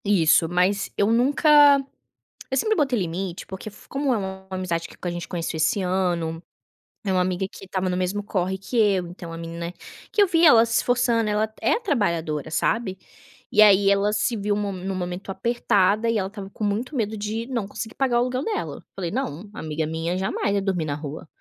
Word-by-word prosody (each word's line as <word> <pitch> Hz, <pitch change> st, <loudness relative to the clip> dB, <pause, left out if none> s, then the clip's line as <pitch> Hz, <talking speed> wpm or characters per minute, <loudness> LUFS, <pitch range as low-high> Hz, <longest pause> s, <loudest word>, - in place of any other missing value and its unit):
Isso, 165 Hz, -4 st, +4 dB
mas 180 Hz, +3 st, +1 dB
eu 205 Hz, +2 st, +3 dB
nunca 285 Hz, +4 st, +6 dB, 0.7 s
eu -, -, +1 dB
sempre 435 Hz, +11 st, +2 dB
botei 275 Hz, -6 st, +2 dB
limite 180 Hz, 0 st, -3 dB
porque 190 Hz, +3 st, -7 dB
fo 210 Hz, -, -15 dB
como 275 Hz, -2 st, 0 dB
é -, -, +1 dB
uma 190 Hz, -1 st, -6 dB
amizade 185 Hz, -3 st, -2 dB
que -, -, -14 dB
a 175 Hz, -, -2 dB
gente 175 Hz, 0 st, -5 dB
conheceu 170 Hz, -2 st, -3 dB
esse 155 Hz, +5 st, +1 dB
ano, 175 Hz, -3 st, -1 dB, 0.7 s
é 195 Hz, -, 0 dB
uma 185 Hz, -1 st, +2 dB
amiga 185 Hz, +1 st, -1 dB
que -, -, -11 dB
estava 185 Hz, 0 st, -2 dB
no 180 Hz, -, -1 dB
mesmo 185 Hz, +3 st, -1 dB
corre 190 Hz, -2 st, -1 dB
que 195 Hz, +6 st, -5 dB
eu, 200 Hz, -5 st, +3 dB
então 170 Hz, -1 st, -9 dB
a -, -, -6 dB
menina 170 Hz, +1 st, -6 dB, 0.4 s
que 420 Hz, -, +4 dB
eu -, -, +2 dB
vi 335 Hz, -1 st, +4 dB
ela 230 Hz, -7 st, +8 dB
se 230 Hz, -, 0 dB
esforçando, 235 Hz, -3 st, +2 dB
ela 215 Hz, +1 st, 0 dB
é -, -, +3 dB
trabalhadora, 170 Hz, -, -1 dB
sabe, 195 Hz, +2 st, 0 dB, 0.5 s
e 210 Hz, -, +5 dB
aí 200 Hz, -1 st, +6 dB
ela 200 Hz, +1 st, +2 dB
se 230 Hz, +2 st, 0 dB
viu 205 Hz, 0 st, 0 dB
mo 205 Hz, -1 st, -2 dB
num 190 Hz, 0 st, -4 dB
momento 180 Hz, +1 st, -5 dB
apertada 215 Hz, 0 st, +1 dB
e 230 Hz, -, +1 dB
ela 190 Hz, -2 st, -1 dB
estava 200 Hz, -2 st, -8 dB
com 215 Hz, -, -7 dB
muito 220 Hz, +8 st, -1 dB
medo 220 Hz, -3 st, -1 dB
de 215 Hz, +3 st, -3 dB
não 235 Hz, -6 st, -2 dB
conseguir 220 Hz, +2 st, -7 dB
pagar 260 Hz, -3 st, +1 dB
o -, -, +3 dB
aluguel 255 Hz, +2 st, -1 dB
dela, 435 Hz, -, -3 dB
eu -, -, -14 dB
falei: 175 Hz, -4 st, -3 dB
"Não, 205 Hz, -, -4 dB
amiga 155 Hz, -3 st, -3 dB
minha 165 Hz, +3 st, -2 dB
jamais 195 Hz, +2 st, -1 dB
vai 200 Hz, -, +1 dB
dormir 190 Hz, -4 st, -1 dB
na 145 Hz, -2 st, -2 dB
rua, 150 Hz, +2 st, -7 dB
195 Hz, 210 wpm, -24 LUFS, 180-225 Hz, 0.7 s, ela